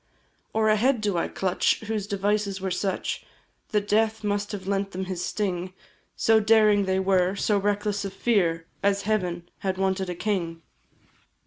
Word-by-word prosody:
Or 220 0 +1
a 215 - +4
head 250 +3 +2
do 205 -3 0
I 170 - 0
clutch, 185 -2 0
whose 215 -2 -3
devices 200 0 0
were 190 0 -3
such, 190 +1 -2 0.5
That 210 -1 0
death 220 +1 +1
must 205 0 -1
have 200 -3 -6
lent 195 0 -1
them 190 +1 -3
his 185 -2 -4
sting 185 -3 -2 0.4
So 220 0 +4
daring 215 -2 +4
they 190 0 +1
were, 190 0 +2
so 205 0 +1
reckless 205 +1 0
of 195 - -4
fear, 180 -6 +1 0.2
As 200 0 +1
heaven 180 -5 -1
had 190 -1 -2
wanted 190 -1 0
a 180 - -3
king? 170 -5 -2
200 Hz, 165 wpm, -26 LUFS, 190-210 Hz, 0.5 s, a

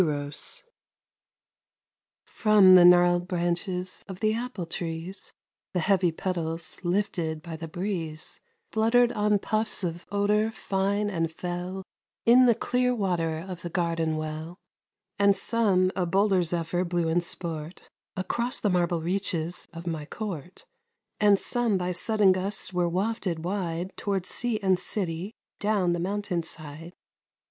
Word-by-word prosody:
EROS 145 - -3 1.6
From 210 -4 +5
the 180 -1 +9
gnarled 175 0 +6
branches 180 +1 -2
of 190 -2 -8
the 215 0 +2
apple 230 -5 -4
trees 170 +3 -5 0.4
The - - +3
heavy 180 0 +3
petals, 165 -1 -3
lifted 175 -4 -1
by 170 -2 -6
the 165 +1 -6
breeze, 165 -3 -4 0.3
Fluttered 235 +2 +4
on 210 -2 +2
puffs 215 0 -1
of 170 0 -4
odor 210 +2 +2
fine 200 -1 -1
and 165 -3 -1
fell 180 +3 -5 0.4
In 250 +2 +7
the 235 - +5
clear 250 +2 +1
water 170 -5 -1
of 180 -2 -7
the 175 - -5
garden 165 -2 0
well; 155 +2 -5 0.6
And 200 -1 +5
some 195 -5 +2
a 180 -2 0
bolder 195 +1 +3
zephyr 170 +1 -1
blew 175 -2 0
in 165 +2 +2
sport 165 -1 -5 0.3
Across 235 +6 -1
the 205 - +2
marble 175 -2 +1
reaches 175 -2 -2
of 165 +1 -9
my 160 -3 -4
court, 180 -4 -6 0.5
And 205 -2 +5
some 240 -5 +1
by 180 0 -1
sudden 205 +2 +3
gusts 190 +1 -1
were 175 -1 +1
wafted 185 -3 -2
wide 180 -1 -3
Toward 195 -3 -1
sea 235 +2 0
and 190 -2 +3
city, 185 +1 -3 0.2
down 200 -4 +1
the 175 - -1
mountain 190 -1 -1
side. 160 +1 -9
180 Hz, 135 wpm, -27 LUFS, 170-205 Hz, 1.6 s, the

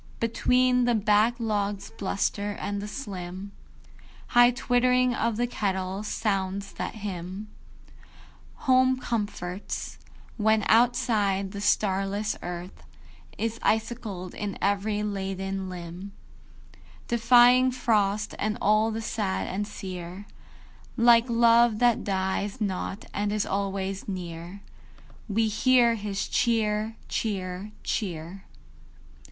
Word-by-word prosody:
Between 250 +2 +2
the 240 -1 +2
back 215 +2 +3
log's 205 -4 -2
bluster 200 +1 -2
and 205 0 -4
the 205 - -5
slim 195 -5 -6 0.8
High 240 0 +7
twittering 250 0 +2
of 230 -2 -1
the 240 - +1
kettle, 190 -4 -2
sounds 195 -2 -2
that - - -5
hymn 195 0 -6 1.2
Home 260 -1 +4
comforts, 205 -6 -4 0.4
when, 220 -1 +2
outside, 215 -4 +2
the 200 0 -6
starless 205 0 +1
Earth 175 +1 -7 0.6
Is 230 0 -2
icicled 220 -5 -1
in 205 -1 -4
every 205 +1 0
laden 195 -1 -3
limb, 180 +2 -8 0.9
Defying 245 +2 +6
frost 215 -4 +1
and 215 +1 -1
all 215 +2 +3
the 225 0 -4
sad 95 - -2
and 205 +2 -3
sear, 185 -1 -7 0.7
Like 235 0 +5
love 235 -1 +5
that 240 0 +3
dies 195 +3 -1
not 195 0 -3
and 205 0 -1
is 210 0 0
always 195 -1 -2
near, 175 0 -6 0.7
We 220 +2 +2
hear 240 +2 +4
his 205 -3 -3
"Cheer, 220 -1 +1
cheer, 195 -1 -3
cheer." 180 -1 -4
205 Hz, 105 wpm, -27 LUFS, 195-230 Hz, 1.2 s, High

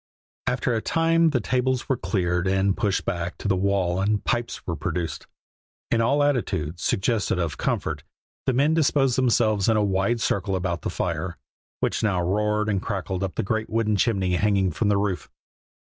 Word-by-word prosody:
After 125 0 0
a 110 - 0
time 165 +2 +3
the 140 -5 +1
tables 130 +2 0
were 135 - +2
cleared 90 -3 -1
and 95 +1 +2
pushed 100 -3 0
back 85 0 -3
to - - -4
the 100 - +3
wall 95 -1 +1
and 105 +1 +1
pipes 120 0 -2
were 85 - -2
produced. 80 +1 -3 0.6
In 115 - +3
all 140 +6 +3
attitudes 95 - -1
suggestive 105 -1 0
of 85 -3 -2
comfort - - -1 0.5
the 130 - +3
men 140 +5 +3
disposed 140 -5 +2
themselves 115 -5 +2
in 110 - +4
a 105 - +3
wide 100 +4 +1
circle 100 -2 0
about 90 -3 -2
the - - -3
fire, - - -3 0.4
which - - 0
now 100 -5 +1
roared 105 +4 0
and 100 -3 0
crackled 95 -3 -3
up 95 -2 -3
the - - -1
great 110 +3 -2
wooden 110 -1 +1
chimney 95 -4 +1
hanging 100 -2 +2
from 100 +7 0
the 100 - +3
roof. 100 -2 -2
100 Hz, 180 wpm, -24 LUFS, 95-120 Hz, 0.6 s, in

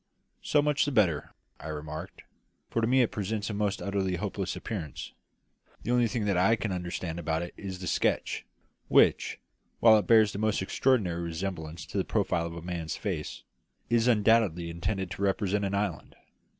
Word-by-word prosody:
"So 145 -1 +2
much 150 0 +2
the 145 - -1
better," 90 - +2 0.3
I - - -8
remarked; 80 +4 -6 0.5
"for 115 - 0
to 115 - +2
me 130 +1 +5
it 115 - -1
presents 105 +1 -2
a - - -4
most 105 -1 -1
utterly 95 -2 -1
hopeless 95 +1 -3
appearance. 85 - -6 0.7
The 120 - -1
only 120 -1 +4
thing 110 -3 -2
I 100 +3 +4
can 105 -1 -3
understand 85 -2 -4
about 80 0 -1
it 85 - -7
is 95 -2 -6
the 90 - -7
sketch, - - 0 0.4
which, - - +4 0.4
while 110 -2 +7
it - - -4
bears 110 -3 +6
the 100 - -4
most 110 -1 +1
extraordinary 95 -6 +1
resemblance 85 -1 -4
to - - -3
the - - +2
profile 85 -1 0
of 85 - -8
a 85 - -8
man's 85 -3 -4
face, - - -4 0.5
is 120 0 +3
undoubtedly 105 -7 +3
intended 95 +3 -3
to - - -6
represent 100 0 +1
an 100 0 -1
island. 100 -8 -3
100 Hz, 175 wpm, -29 LUFS, 85-110 Hz, 0.7 s, while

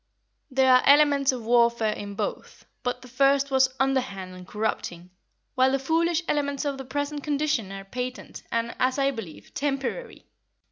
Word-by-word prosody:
There 260 -1 +4
are 255 - +6
elements 285 -1 +5
of 245 -3 -6
warfare 235 -2 +3
in 200 -1 -7
both, 210 -1 -5 0.2
but 250 0 -3
the - - -11
first 275 +2 +2
was 265 -1 +4
underhand 250 -9 -1
and 180 0 -11
corrupting, 180 -5 -3 0.4
while 260 +1 +3
the 270 - +2
foolish 330 +5 +1
elements 285 -1 -1
of 280 -2 -2
the 265 - -6
present 285 +2 -3
condition 285 -8 -1
are 195 0 -7
patent 250 +4 -6
and, 230 0 -1
as 255 +1 +1
I 275 0 +2
believe, 220 - -9
temporary. 290 - -3
260 Hz, 160 wpm, -26 LUFS, 230-280 Hz, 0.4 s, are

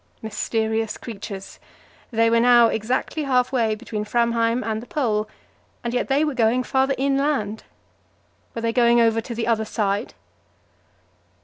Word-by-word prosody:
Mysterious 220 0 -2
creatures! 200 -3 -8 0.5
they 230 -1 +2
were 230 - +4
now 240 -1 +6
exactly 245 +8 -2
half 250 -2 +2
way 230 -4 +1
between 215 -1 -5
Framheim 235 +1 +1
and 220 -1 -2
the 240 - -12
Pole, 220 -9 -1 0.5
and 235 0 -3
yet 245 - 0
they 280 +2 +2
were 300 - -1
going 245 0 +2
farther 265 +1 +1
inland. 270 -6 0 0.9
Were 230 - -4
they 230 0 0
going 235 -1 +4
over 225 -1 +3
to 235 +1 -7
the 230 - -2
other 225 -2 +1
side? 205 -2 -2
230 Hz, 145 wpm, -22 LUFS, 220-250 Hz, 0.9 s, now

